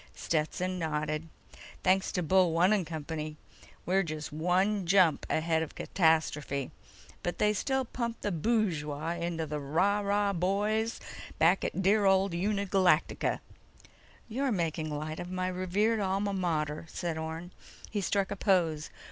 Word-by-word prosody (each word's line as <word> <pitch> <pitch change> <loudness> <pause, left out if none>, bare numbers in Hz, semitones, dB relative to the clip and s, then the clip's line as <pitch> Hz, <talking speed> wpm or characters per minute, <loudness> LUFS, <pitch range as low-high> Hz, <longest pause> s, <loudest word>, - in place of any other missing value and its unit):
Stetson 180 +4 -1
nodded. 155 0 -2 0.5
"Thanks 190 +1 +3
to 180 - 0
Bullone 180 +2 +4
and 190 -6 0
company! 155 -1 -5 0.5
We're 190 +2 +3
just 155 -4 -5
one 180 +4 +1
jump 180 -4 +4
ahead 160 0 +1
of 160 - -5
catastrophe, 155 -5 +1 0.5
but 175 - -3
they 210 0 +3
still 265 +5 0
pump 235 -1 -4
the 205 - -1
bushwah 165 -5 -1
into 170 -1 -2
the 150 0 -4
Rah 180 +9 +1
& - - -3
Rah 200 0 +1
boys 205 +5 0 0.4
back 170 +4 +4
at 190 - -2
dear 205 +2 +4
old 190 -1 +3
Uni 200 +3 0
Galacta!" 185 -4 +2 0.9
"You're 265 +4 -1
making 165 -5 -1
light 155 +1 -4
of 175 - -6
my 185 0 -2
revered 185 +5 +1
alma 200 +1 0
mater," 160 -4 -1
said 170 -2 -3
Orne. 160 +2 -5 0.4
He 205 - -1
struck 195 +1 0
a - - -1
pose. 170 -7 +1
180 Hz, 145 wpm, -30 LUFS, 160-200 Hz, 0.9 s, Bullone